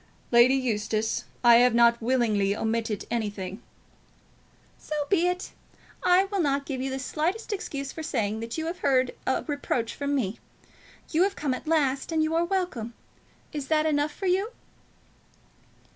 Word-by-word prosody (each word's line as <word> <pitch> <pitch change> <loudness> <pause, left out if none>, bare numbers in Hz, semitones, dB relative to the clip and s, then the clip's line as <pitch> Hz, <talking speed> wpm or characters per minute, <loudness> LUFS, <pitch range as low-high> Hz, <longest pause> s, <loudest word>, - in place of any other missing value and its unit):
"Lady 240 +2 +6
Eustace, 220 -3 -1 0.2
I 235 -1 +8
have 245 -1 +4
not 235 0 +5
willingly 220 -5 +1
omitted 225 -1 -2
anything." 205 -3 -3 1.2
"So 305 - -5
be 355 -3 +3
it. 360 0 -2 0.5
I 360 +1 +5
will 395 0 -3
not 280 -2 0
give 265 -3 -4
you 265 - -2
the 265 - -3
slightest 335 - -2
excuse 280 -8 -4
for 320 - -7
saying 220 -8 -1
that 230 +4 -5
you 320 - -2
have 345 +2 -4
heard 260 -4 +2
a 260 - +1
reproach 285 -5 -2
from 285 0 -2
me. 220 -6 -2 0.7
You 325 - +2
have 395 +1 +2
come 285 -4 -1
at 255 - -7
last, 285 -3 +1
and 320 -1 +2
you 315 +1 0
are 335 +1 +2
welcome. 340 - -2 0.6
Is 290 -3 -4
that 310 0 +2
enough 295 -1 +1
for 390 - -7
you?" 380 +4 +2
270 Hz, 160 wpm, -27 LUFS, 235-320 Hz, 1.2 s, I